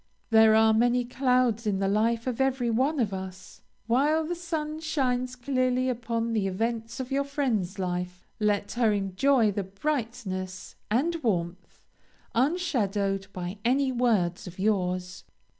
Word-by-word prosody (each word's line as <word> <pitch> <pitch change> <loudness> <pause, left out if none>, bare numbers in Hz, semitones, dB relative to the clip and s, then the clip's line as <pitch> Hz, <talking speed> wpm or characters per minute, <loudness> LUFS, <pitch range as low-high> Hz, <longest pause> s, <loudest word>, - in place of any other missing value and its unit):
There 220 -1 +7
are 220 0 +5
many 240 +2 +2
clouds 250 -3 +1
in 200 -2 +1
the 195 0 0
life 225 +3 +1
of 255 0 -2
every 260 -3 +1
one 270 +6 +1
of 210 -5 0
us. 190 0 -8 0.2
While 290 +7 +2
the 345 - -2
sun 320 -3 -4
shines 255 -5 -1
clearly 255 0 0
upon 230 -1 -2
the 210 -3 +1
events 225 +5 -3
of 260 0 -5
your 275 +1 +1
friend's 240 -10 -1
life 180 -1 -3
let 205 -1 0
her 235 -3 +2
enjoy 210 +4 +2
the 200 - -2
brightness 195 -4 -4 0.2
and 315 +10 0
warmth, 180 - -3 0.5
unshadowed 210 - 0
by 180 +2 -6
any 265 +2 +2
words 215 -9 +1
of 180 - -10
yours. 185 -3 -1
230 Hz, 140 wpm, -27 LUFS, 195-255 Hz, 0.5 s, There